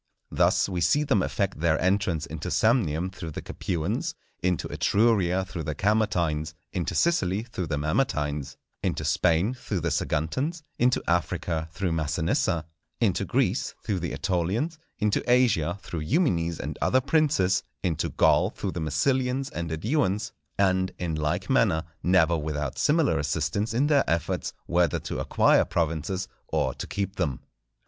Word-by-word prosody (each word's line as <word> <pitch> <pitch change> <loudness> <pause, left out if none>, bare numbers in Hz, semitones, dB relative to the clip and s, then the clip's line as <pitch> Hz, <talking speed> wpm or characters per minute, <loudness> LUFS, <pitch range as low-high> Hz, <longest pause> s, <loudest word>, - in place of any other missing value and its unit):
Thus - - +3
we 90 -3 -3
see 145 - +3
them 110 -9 +2
effect 95 -2 -1
their 80 -1 +2
entrance 95 -4 +1
into 80 +2 -5
Samnium 95 - +2
through 85 -4 -6
the 75 - -6
Capuans, 90 +7 -2 0.3
into 90 -2 0
Etruria 95 -4 +2
through 90 -3 -6
the 75 -1 -3
Camertines, 85 -7 +1 0.2
into 90 -4 -2
Sicily 105 - +2
through 105 -7 -5
the 75 - -1
Mamertines, 75 - -1 0.3
into 75 - -1
Spain 85 - +2
through 120 -7 -4
the 85 0 -1
Saguntans, 130 - -1 0.2
into 125 +1 +3
Africa 85 -1 -1
through 90 +1 -2
Massinissa, 80 +1 0 0.3
into - - +1
Greece - - 0
through 100 -4 -1
the 85 - -3
Etolians, 100 - -1 0.2
into 105 -1 +1
Asia 100 -9 +3
through 85 - -5
Eumenes 85 - +1
and - - -5
other 130 - +4
princes, 130 - +2 0.2
into 85 -5 0
Gaul - - +3
through - - -4
the 85 - -4
Massilians 130 - 0
and 85 -1 -4
Eduans; 105 - 0 0.3
and, 95 -1 +2
in 85 -2 -2
like 75 -1 -1
manner, 80 0 +3 0.2
never 85 -2 +4
without 75 -3 -3
similar 150 - +3
assistance 75 +8 -1
in 125 +6 +2
their 145 - +3
efforts 85 0 -1
whether 85 0 +2
to - - -4
acquire - - +4
provinces 85 +3 -1 0.2
or - - 0
to - - -6
keep 100 -1 -3
them. 70 -5 -1
90 Hz, 150 wpm, -26 LUFS, 80-110 Hz, 0.3 s, other